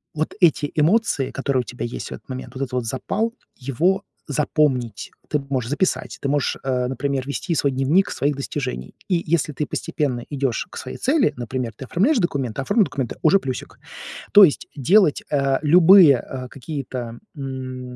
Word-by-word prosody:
вот 155 Hz, +1 st, -2 dB
эти 155 Hz, -4 st, +3 dB
эмоции, 160 Hz, -, +2 dB
которые 135 Hz, -1 st, 0 dB
у -, -, -6 dB
тебя 120 Hz, 0 st, -6 dB
есть 120 Hz, -, -6 dB
в -, -, -6 dB
этот -, -, -15 dB
момент, 130 Hz, 0 st, -7 dB
вот 135 Hz, -, -2 dB
этот 135 Hz, -, -5 dB
вот 125 Hz, -2 st, -1 dB
запал, 200 Hz, -, -2 dB, 0.2 s
его 170 Hz, +10 st, 0 dB, 0.3 s
запомнить. 140 Hz, -5 st, 0 dB, 0.2 s
Ты 150 Hz, -, +1 dB
можешь 125 Hz, -4 st, -1 dB
записать, 170 Hz, +6 st, -1 dB
ты -, -, -2 dB
можешь, 145 Hz, 0 st, 0 dB
э, 125 Hz, -2 st, -1 dB
например, 135 Hz, 0 st, -2 dB
вести 160 Hz, +4 st, -3 dB
свой 140 Hz, -1 st, +1 dB
дневник 140 Hz, +9 st, +2 dB
своих 145 Hz, 0 st, 0 dB
достижений. 130 Hz, -, -4 dB
И 175 Hz, -3 st, +1 dB
если 155 Hz, -2 st, 0 dB
ты 150 Hz, -, -2 dB
постепенно 140 Hz, -4 st, -2 dB
идешь 135 Hz, -5 st, -2 dB
к -, -, -13 dB
своей 130 Hz, -, -6 dB
цели, 270 Hz, -, +2 dB
например, 120 Hz, 0 st, -3 dB
ты 135 Hz, -, -7 dB
оформляешь 240 Hz, -, +2 dB
документы, 135 Hz, -, -1 dB
оформил 215 Hz, -, +3 dB
документы- 135 Hz, -, -4 dB
уже 165 Hz, +5 st, +5 dB
плюсик. 130 Hz, -7 st, -6 dB, 0.5 s
То 205 Hz, -1 st, +10 dB
есть 150 Hz, -, -2 dB
делать, 165 Hz, -, +4 dB
а, 135 Hz, -2 st, +1 dB
любые, 165 Hz, -2 st, +7 dB
а, 130 Hz, +1 st, -7 dB
какие-то, 125 Hz, -3 st, -6 dB, 0.2 s
м, 130 Hz, -2 st, -6 dB
140 Hz, 175 wpm, -22 LUFS, 130-160 Hz, 0.5 s, То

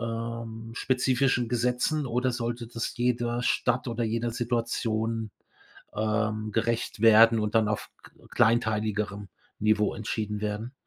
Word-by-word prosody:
ähm, 115 Hz, 0 st, -5 dB
spezifischen 125 Hz, -1 st, +1 dB
Gesetzen 125 Hz, +5 st, 0 dB
oder 125 Hz, +2 st, 0 dB
sollte 120 Hz, 0 st, -3 dB
das 115 Hz, 0 st, -5 dB
jeder 120 Hz, 0 st, 0 dB
Stadt 125 Hz, +1 st, +1 dB
oder 120 Hz, 0 st, -2 dB
jeder 115 Hz, +2 st, -1 dB
Situation, 115 Hz, -2 st, -1 dB, 0.6 s
ähm, 110 Hz, 0 st, -1 dB
gerecht 115 Hz, 0 st, -1 dB
werden 115 Hz, 0 st, +7 dB
und 105 Hz, 0 st, -2 dB
dann 110 Hz, -2 st, +3 dB
auf 105 Hz, -, -3 dB
k -, -, -16 dB, 0.2 s
kleinteiligerem 105 Hz, -3 st, +1 dB, 0.3 s
Niveau 105 Hz, 0 st, +2 dB
entschieden 105 Hz, -1 st, -3 dB
werden? 105 Hz, +3 st, -3 dB
115 Hz, 120 wpm, -27 LUFS, 110-120 Hz, 0.6 s, werden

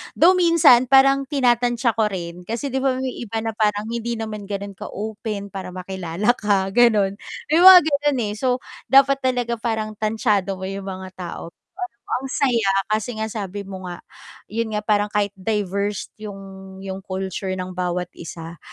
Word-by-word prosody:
Though 360 Hz, +3 st, +6 dB
minsan 330 Hz, -8 st, +5 dB
parang 275 Hz, +1 st, +6 dB
tinatansya 245 Hz, -4 st, +1 dB
ko 215 Hz, -2 st, +1 dB
rin, 175 Hz, -1 st, -6 dB
kasi 230 Hz, +8 st, -4 dB
'di 265 Hz, 0 st, -2 dB
ba 270 Hz, -, +3 dB
may 260 Hz, -1 st, -3 dB
iba 225 Hz, -1 st, -4 dB
na 225 Hz, 0 st, -4 dB
parang 210 Hz, -1 st, 0 dB
hindi 235 Hz, 0 st, -3 dB
naman 215 Hz, -2 st, -5 dB
gano'n 200 Hz, 0 st, -5 dB
ka-open 210 Hz, 0 st, -5 dB
para 195 Hz, -2 st, -7 dB
makilala 185 Hz, +4 st, -1 dB
ka, 200 Hz, -4 st, +1 dB
gano'n. 210 Hz, -5 st, +4 dB, 0.3 s
May 315 Hz, +2 st, +3 dB
mga 375 Hz, -1 st, +12 dB
gano'n, 290 Hz, -3 st, 0 dB
eh. 205 Hz, -, -3 dB
So 250 Hz, +2 st, 0 dB, 0.3 s
dapat 275 Hz, 0 st, +5 dB
talaga 245 Hz, -2 st, 0 dB
parang 220 Hz, -2 st, -3 dB
tantyado 210 Hz, -3 st, 0 dB
mo 190 Hz, -, -4 dB
'yong 195 Hz, 0 st, -5 dB
mga 190 Hz, -1 st, -7 dB
tao. 175 Hz, -2 st, -7 dB, 0.3 s
Pero 365 Hz, -8 st, -5 dB, 0.2 s
ang 265 Hz, +2 st, -2 dB
saya, 235 Hz, -7 st, +2 dB, 0.2 s
kasi 220 Hz, +2 st, -1 dB
nga 220 Hz, -, -1 dB
sabi 200 Hz, -1 st, -5 dB
mo 190 Hz, -1 st, -8 dB
nga, 175 Hz, -, -9 dB, 0.5 s
'yon 230 Hz, +1 st, -2 dB
nga, 210 Hz, -, -2 dB
parang 210 Hz, -1 st, +2 dB
kahit 205 Hz, -1 st, 0 dB
diverse 200 Hz, 0 st, -2 dB
'yong 195 Hz, -2 st, -9 dB
'yong 190 Hz, 0 st, -5 dB
culture 190 Hz, 0 st, -4 dB
ng 185 Hz, 0 st, -5 dB
bawat 180 Hz, 0 st, -2 dB
isa, 165 Hz, -1 st, -9 dB
210 Hz, 170 wpm, -22 LUFS, 195-245 Hz, 0.5 s, mga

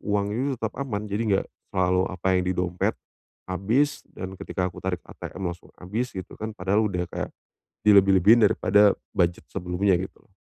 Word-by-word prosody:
uangnya 105 Hz, +7 st, -1 dB
tetap 110 Hz, -1 st, -3 dB
aman, 105 Hz, -7 st, -3 dB
jadi 105 Hz, +1 st, -2 dB
enggak 95 Hz, -1 st, +2 dB, 0.2 s
selalu 90 Hz, 0 st, +1 dB
apa 90 Hz, 0 st, -6 dB
yang 90 Hz, -, +1 dB
di -, -, +2 dB
dompet 90 Hz, 0 st, 0 dB, 0.5 s
habis, 110 Hz, -, +1 dB
dan 95 Hz, 0 st, -6 dB
ketika 90 Hz, -1 st, -2 dB
aku -, -, -12 dB
tarik 90 Hz, -2 st, -3 dB
ATM 90 Hz, -2 st, -5 dB
langsung 85 Hz, -, -15 dB
habis 110 Hz, +8 st, -4 dB
gitu 95 Hz, -, -6 dB
kan, 110 Hz, 0 st, -5 dB
padahal 100 Hz, +4 st, +2 dB
udah 90 Hz, -3 st, -2 dB
kayak -, -, -3 dB, 0.6 s
dilebih-lebihin 100 Hz, +2 st, +6 dB
daripada 105 Hz, +1 st, +4 dB, 0.2 s
budget 85 Hz, -1 st, +1 dB
sebelumnya 90 Hz, +1 st, +1 dB
gitu 95 Hz, +2 st, -7 dB
loh. 95 Hz, -, -34 dB
95 Hz, 165 wpm, -25 LUFS, 90-105 Hz, 0.6 s, dilebih-lebihin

